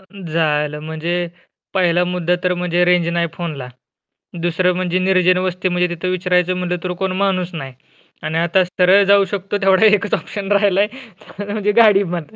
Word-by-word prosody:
अ - - -22 0.3
झालं 150 -2 0
म्हणजे 160 +2 -4 0.6
पहिला 175 -2 +2
मुद्दा 180 -1 -1
तर 180 - +2
म्हणजे 180 0 0
रेंज 175 -1 +2
नाही 170 0 0
फोनला. 150 -7 -6 0.7
दुसरं 175 +2 +1
म्हणजे 180 0 -1
निर्जन 185 -1 +3
वस्ती 185 +1 -2
म्हणजे, 180 0 +1
तिथं 175 +1 -5
विचारायचं 180 0 0
म्हणलं 180 -1 -2
तर 180 - -3
कोण 190 -1 -1
माणूस 185 -2 -1
नाही 135 -5 -7 0.5
आणि 160 +1 -2
आता 170 +3 +2
सरळ 180 +2 +3
जाऊ 200 -1 +5
शकतो 200 +1 -3
तेवढा 195 +2 +4
एकच 205 -1 +2
ऑप्शन 205 -1 -4
राहिला 200 -1 +3
आहे 215 +6 -3 0.4
अ, 205 0 -5
म्हणजे 210 -1 0
गाडी 205 -3 +5
बंद. 175 -1 -5
180 Hz, 175 wpm, -18 LUFS, 170-195 Hz, 0.7 s, जाऊ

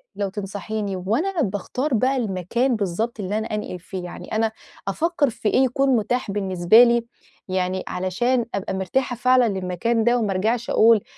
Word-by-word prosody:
لو 200 -1 -2
تنصحيني 205 +1 -4
وأنا 275 - -1
باختار 250 +6 -2
بقى 255 +4 +2
المكان 235 +4 0
بالضبط 215 +3 -2
اللي 200 +1 -2
أنا 220 +1 -2
أنقِل 210 -3 -5
فيه، 185 +1 -7
يعني 175 - -9
أنا 220 0 +1 0.4
أفكّر 310 - +1
في 220 -2 -2
إيه 260 - +3
يكون 270 +2 +1
متاح 230 0 -1
بالنسبة 195 +2 +5
لي 235 -1 +3 0.4
يعني 185 0 -1
علشان 235 +7 0
أبقى 195 -1 -3
مرتاحة 220 +7 -1
فعلًا 255 +1 +4
للمكان 195 +4 -1
ده 240 +2 +3
وما 215 -4 0
أرجَعش 220 +5 0
أقول 225 -2 +5
215 Hz, 160 wpm, -23 LUFS, 190-245 Hz, 0.4 s, بالنسبة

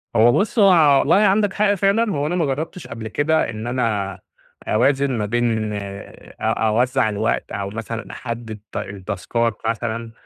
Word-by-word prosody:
هو 115 +2 +6
بُص، 215 - 0
هو 160 -8 +6
والله 150 - +3
عندك 205 0 +3
حق 205 -1 +2
فعلًا، 200 +3 +2
هو 145 -2 -1
أنا 175 - -1
ما 170 -4 +1
جرّبتش 160 +7 -4
قبل 115 -1 -7
كده 150 +2 +1
إن 110 +1 -6
أنا 105 -6 -1 0.5
أوازن 135 +4 +2
ما 105 - -1
بين 110 -1 0
أ 100 -1 -8
أوزَّع 120 +2 +1
الوقت 105 - -1
أو 100 -1 -3
مثلًا 115 +1 -6
أحدّد 115 -3 -6
ت - - -5
التاسكات 105 +4 -2
مثلًا 115 0 -2
120 Hz, 160 wpm, -21 LUFS, 110-155 Hz, 0.5 s, هو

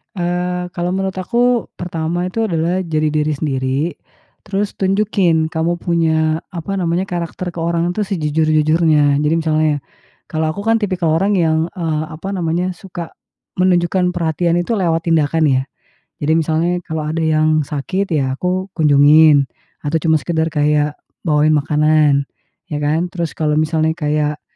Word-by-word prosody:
Eee, 180 0 -2
kalau 175 0 -1
menurut 190 0 -2
aku 235 +5 0
pertama 175 0 -2
itu, 225 +5 -2
adalah 175 -1 0
jadi 155 -2 0
diri 150 0 0
sendiri, 135 -2 -1 0.6
terus 200 0 -2
tunjukin 190 -5 +1
kamu 165 +2 -1
punya, 160 -2 +1
apa 185 +2 -4
namanya, 180 0 -1
karakter 175 0 -4
ke - - -5
orang, 170 +1 0
tuh, 215 - 0
sejujur-jujurnya 155 -4 +2
jadi 150 +2 +2
misalnya, 155 -2 +1 0.5
kalau 155 0 -1
aku, 200 +6 -6
kan, 225 - +4
tipikal 180 -5 0
orang 195 +3 +2
yang, 160 -2 +2
eee, 160 -4 -2
apa 160 +5 -8
namanya, 175 +1 -1
suka 175 -2 -8 0.4
menunjukkan 180 0 +2
perhatiannya, 170 0 0
tuh, 230 - 0
lewat 165 0 0
tindakan 160 0 +2
ya. 130 -2 +2 0.5
Jadi 150 +2 -1
misalnya 165 +2 0
kalau 160 -1 -3
ada 155 +2 -2
yang 155 -1 +2
sakit 185 +7 -2
ya 140 -5 0
aku 185 +1 -2
kunjungin, 150 -1 +5 0.4
atau 150 +3 0
cuma 160 0 +2
sekedar 160 +1 -1
kayak 150 -1 +1 0.3
bawain 150 0 +3
makanan, 150 -1 +3 0.5
ya, 150 - -1
kan. 160 +4 0
Terus 170 -4 -3
kalau 155 -1 +1
misalnya 155 0 +1
kayak 150 -2 -1
165 Hz, 145 wpm, -18 LUFS, 155-180 Hz, 0.6 s, kunjungin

